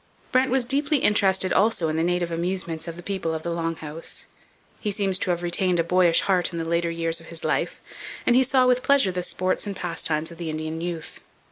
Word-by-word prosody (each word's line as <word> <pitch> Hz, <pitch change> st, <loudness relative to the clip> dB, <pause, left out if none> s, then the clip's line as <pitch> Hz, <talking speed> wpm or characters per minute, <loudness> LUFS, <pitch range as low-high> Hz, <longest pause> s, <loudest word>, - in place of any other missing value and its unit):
Brant 255 Hz, +1 st, +3 dB
was 255 Hz, -1 st, +1 dB
deeply 285 Hz, +4 st, +1 dB
interested 190 Hz, -5 st, +2 dB
also 200 Hz, -5 st, +2 dB
in 155 Hz, -, -1 dB
the 160 Hz, -, +1 dB
native 175 Hz, 0 st, 0 dB
amusements 170 Hz, -1 st, -2 dB
of 165 Hz, -, -5 dB
the 175 Hz, -, -9 dB
people 185 Hz, -5 st, -2 dB
of 160 Hz, -, -5 dB
the 170 Hz, -, -2 dB
Long 165 Hz, 0 st, -2 dB
House. 155 Hz, +1 st, -6 dB, 0.5 s
He 210 Hz, -, -2 dB
seems 195 Hz, -2 st, 0 dB
to -, -, -2 dB
have 175 Hz, 0 st, 0 dB
retained 175 Hz, 0 st, +1 dB
a -, -, +3 dB
boyish 175 Hz, 0 st, +4 dB
heart 185 Hz, -3 st, +1 dB
in 170 Hz, -, -5 dB
the 165 Hz, -, -2 dB
later 170 Hz, +1 st, 0 dB
years 165 Hz, 0 st, -1 dB
of 165 Hz, -, -14 dB
his 165 Hz, -1 st, -6 dB
life, -, -, -1 dB, 0.5 s
and 240 Hz, -, +4 dB
he 255 Hz, -, +6 dB
saw 260 Hz, 0 st, +3 dB
with 250 Hz, 0 st, +3 dB
pleasure 275 Hz, -8 st, +4 dB
the 180 Hz, 0 st, -2 dB
sports 185 Hz, +3 st, -1 dB
and 200 Hz, -, -4 dB
pastimes 165 Hz, -3 st, -2 dB
of 170 Hz, -, -12 dB
the 170 Hz, -2 st, -3 dB
Indian 155 Hz, +1 st, -4 dB
youth. 170 Hz, -2 st, -5 dB
175 Hz, 230 wpm, -24 LUFS, 165-195 Hz, 0.5 s, he